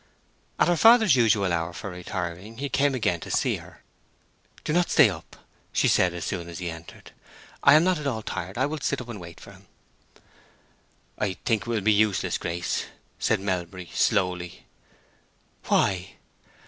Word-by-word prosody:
At - - +3
her 175 - +3
father's 225 - +6
usual 105 -6 +3
hour 85 0 -2
for 95 +2 -7
retiring 90 +4 -6
he 140 - -4
again 140 -1 +1
came 100 - +2
in 85 - -6
to - - -9
see - - +1
her. - - -15 0.8
"Do 150 - -2
not 175 +1 +2
stay 135 -10 +6
up," - - -10 0.4
she - - +2
said, 90 -1 +3
as 85 - -5
soon 85 -3 -4
as 85 - -8
he 90 -2 -4
entered. 80 0 -12 0.5
"I 140 - +7
am 155 - +6
not 185 -2 +1
at 150 - -4
all 110 -5 -2
tired. 95 +1 -5
I 130 - +2
will 150 +2 -4
sit 140 0 -1
up 125 - -7
for 110 -6 -8 0.3
him." - - -18 1.5
"I 95 - 0
think 110 -3 +2
it - - -10
will 115 -3 -1
be 110 +2 +3
useless, 105 -3 +1
Grace," 85 +1 -2 0.3
said - - +1
Melbury, 90 -2 -4
slowly. 90 -4 0 1.0
"Why?" 95 0 +1
100 Hz, 175 wpm, -25 LUFS, 90-130 Hz, 1.5 s, I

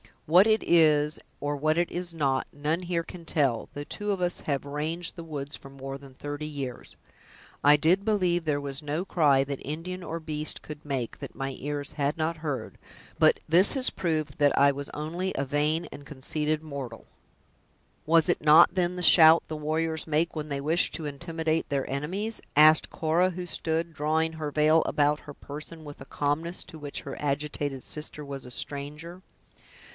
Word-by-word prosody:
"What 180 +7 +6
it 220 -1 +3
is, 155 -2 +4 0.2
or 145 0 -1
what 155 +3 +1
it 175 0 +1
is 175 -1 -4
not, 135 -5 0
none 155 +5 -1
here 170 -1 -1
can 170 0 -11
tell, 135 -8 +1
though 145 - -5
two 205 +7 -3
of 195 -2 -2
us 175 0 -1
have 140 -2 -2
ranged 155 +4 -3
the 170 -2 -8
woods 145 -2 -5
for 135 - -13
more 135 0 -7
than 135 -1 -14
thirty 145 +2 -5
years. 135 -5 -6 0.7
I 145 +1 +8
did 170 +6 +3
believe 180 -6 +1
there 145 -2 0
was 140 0 -3
no 150 +3 -2
cry 145 -7 +3
that 140 0 -5
Indian 175 +5 -5
or 165 0 -5
beast 155 -1 -4
could 150 0 -10
make, 135 -5 -3
that - - -8
my 135 -1 -4
ears 145 0 -4
had 145 0 -1
not 160 +1 -1
heard; 150 -4 -5 0.4
but - - +4
this 175 +5 +7
has 265 -3 +2
proved 155 -4 -2
that 145 -2 +3
I 140 0 +6
was 140 +1 -6
only 170 +5 -3
a 140 - 0
vain 150 +4 0
and 145 - -10
conceited 150 +3 -2
mortal." 140 -7 -7 1.0
"Was 165 0 +4
it - - +1
not, 155 +3 +7
then, 180 -1 0
the 180 - -4
shout 165 -1 +8
the 155 - -4
warriors 160 +1 -2
make 160 +2 +1
when 155 -1 -4
they 140 -2 -3
wish 160 +5 +2
to 160 - -4
intimidate 160 +2 -2
their 140 -2 -1
enemies?" 185 +11 -3
asked 155 +1 +6
Cora 170 +4 +1
who 180 0 -5
stood 165 -1 -2
drawing 160 +2 0
her 155 -2 -4
veil 155 +2 +4
about 150 0 +2
her 145 - -10
person, 150 +3 -9
with 145 -1 -10
a - - -8
calmness 150 +6 -1
to 160 - -12
which 145 -1 -5
her 135 - -7
agitated 145 -1 -2
sister 150 0 -5
was 140 -1 -7
a 125 - -9
stranger. 150 +7 -6
155 Hz, 190 wpm, -27 LUFS, 145-165 Hz, 1.0 s, I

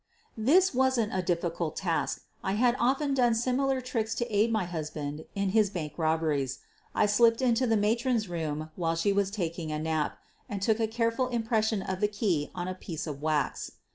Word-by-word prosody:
This 310 +12 +4
wasn't 255 -4 +2
a 185 - +1
difficult 170 -2 -1
task 170 -4 -1
— - - -38
I 190 - 0
had 240 +3 +3
often 275 +4 +2
done 245 -3 +3
similar 260 +3 +1
tricks 225 -3 -2
to 240 -3 -2
aid 215 +3 +3
my 215 -4 +1
husband 155 -3 -5
in 200 -1 0
his 210 0 +3
bank 155 -6 -5
robberies. 155 -5 0 0.4
I - - +4
slipped 230 +2 +4
into 255 -1 +2
the 225 -1 +3
matron's 225 +1 +1
room 155 -2 -3
while 165 -2 0
she 185 +5 +1
was 200 -1 +1
taking 170 -5 -3
a 155 - -1
nap 155 -1 -1 0.3
and 205 - -3
took 215 +3 +1
a 225 - +2
careful 230 +3 0
impression' 225 -4 0
of 185 -1 -3
the 210 - +3
key 195 -8 -1
on 175 - -3
a 185 - -2
piece 170 -3 -6
of 145 -3 -6
wax. 155 -1 -1
205 Hz, 195 wpm, -29 LUFS, 165-235 Hz, 0.4 s, This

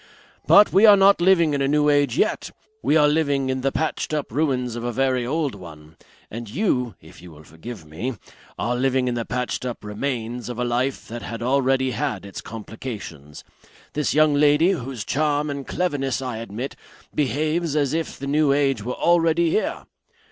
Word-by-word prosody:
But 205 - +6
we 205 +3 +7
are 205 -1 +8
not 195 -1 +5
living 170 -4 +4
in 140 - 0
a 135 - +2
new 150 +1 +2
age 145 -3 +2
yet; - - 0 0.3
we 155 - +3
are 150 -1 +5
living 145 -3 +1
in 130 0 -2
the 135 +1 0
patched 155 0 -2
up 150 -6 -3
ruins 125 -3 0
of 120 - -5
a 120 - -2
very 130 0 0
old 150 0 -1
one. 80 -5 -12 0.4
And 115 0 -7
you 125 - -1
if 80 - -15
you 90 - -12
will 80 -1 -14
forgive 80 +5 -10
me 90 +12 -5 0.4
are 120 +2 -1
living 130 0 +1
in 125 - 0
the 120 -1 -3
patched 125 +3 -3
up 125 -3 -5
remains 120 +2 -4
of 120 - -5
a 125 - -1
life 125 +3 -1
that 120 +1 -7
had 115 +1 -6
already 130 0 +2
had 125 -9 -3
its 100 - -8
complications. 105 - -8 0.5
This 150 -1 0
young 155 -1 +5
lady, 150 +4 +4
whose 125 - -4
charm 150 +2 0
and 140 -1 -6
cleverness 145 -7 -1
I 125 -4 -4
admit, 115 +4 -6 0.4
behaves 155 +3 0
as 145 -2 +1
if 165 -1 -3
the 140 - -6
new 145 +1 +2
age 135 -5 +1
were 125 +3 -3
already 170 -1 +2
here. 215 - -1
135 Hz, 190 wpm, -23 LUFS, 120-150 Hz, 0.5 s, are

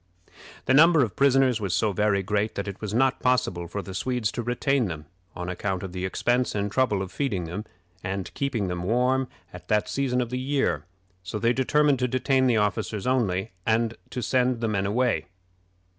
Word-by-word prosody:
The 130 - +3
number 160 +1 +6
of 110 - -3
prisoners 135 -4 +3
was 95 -4 0
so 105 +3 +1
very 100 -1 +1
great 105 +2 -1
that 100 - -3
it 100 -1 -6
was 105 -2 -4
not 130 +4 +2
possible 95 -9 0
for 100 +4 -5
the 95 - -8
Swedes 120 +2 -1
to - - -3
retain 125 +2 +1
them, 80 -5 -5 0.3
on 90 0 -5
account 90 0 -3
of 95 - -5
the 90 +1 -4
expense 120 +6 0
and 100 0 -1
trouble 105 -6 +1
of 95 - -8
feeding 115 -11 -1
them, 90 +6 -5 0.4
and 95 -1 -4
keeping 125 -8 -1
them 90 -1 -3
warm 125 +6 +1 0.3
at 90 - -11
that 105 0 +1
season 130 -2 0
of 120 -1 -2
the 125 - -2
year; 130 - 0 0.4
so 90 +4 -5
they 115 +3 +2
determined 145 +1 +2
to 125 - +1
detain 130 +1 +2
the 120 -3 +3
officers 105 0 -1
only, 110 -6 0
and 115 +1 +1 0.2
to 125 - -4
send 125 -1 +1
the 115 - -1
men 100 -2 0
away. 120 -4 0
110 Hz, 200 wpm, -26 LUFS, 95-130 Hz, 0.4 s, number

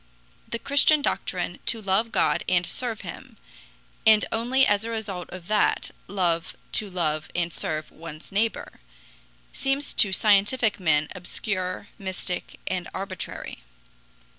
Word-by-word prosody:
The 235 - -2
Christian 285 +4 +5
doctrine - - -1
to 230 - +1
love 210 +3 +1
God - - +2
and 180 -1 +3
serve 235 +1 -2
him, - - -9 0.7
and 215 -1 +6
only 245 +4 +3
as 205 0 +2
a 230 - -3
result 205 -6 -4
of 180 -1 -9
that 215 -1 +2 0.2
love 175 -3 0 0.2
to 210 - +2
love 155 -4 -1
and 175 -1 0
serve 155 0 -2
one's 155 +1 -10
neighbor, 220 +3 -1 0.7
seems 275 +1 0
to 200 - +5
scientific 210 +3 +3
men 155 -4 +2
obscure, 185 +1 -3
mystic, 190 -2 -3
and 180 -2 -2
arbitrary. 190 0 -5
195 Hz, 130 wpm, -26 LUFS, 180-225 Hz, 0.7 s, and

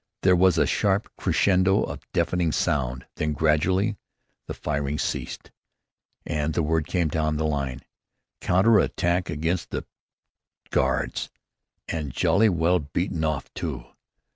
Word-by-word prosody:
There 95 -1 +5
was 90 -1 +4
a - - +4
sharp 100 0 0
crescendo 95 0 +2
of - - -7
deafening 90 -3 +1
sound, 65 -4 -1
then, 75 0 0
gradually, 90 +8 +1 0.5
the - - -5
firing 70 -1 -2
ceased, - - -4 0.7
and 75 0 -2
word 80 -1 +1
came 90 -3 +1
down 75 0 0
the 80 - -1
line, 70 -4 -2 0.6
"Counter 100 +4 +4
attack 85 -1 0
against 80 +4 -2
the - - -4 0.9
Guards; - - 0 0.6
and 75 -4 -3
jolly 105 - +3
well 85 0 +2
beaten 80 +3 -2
off 80 -3 -2
too." - - -4
80 Hz, 125 wpm, -25 LUFS, 75-90 Hz, 0.9 s, There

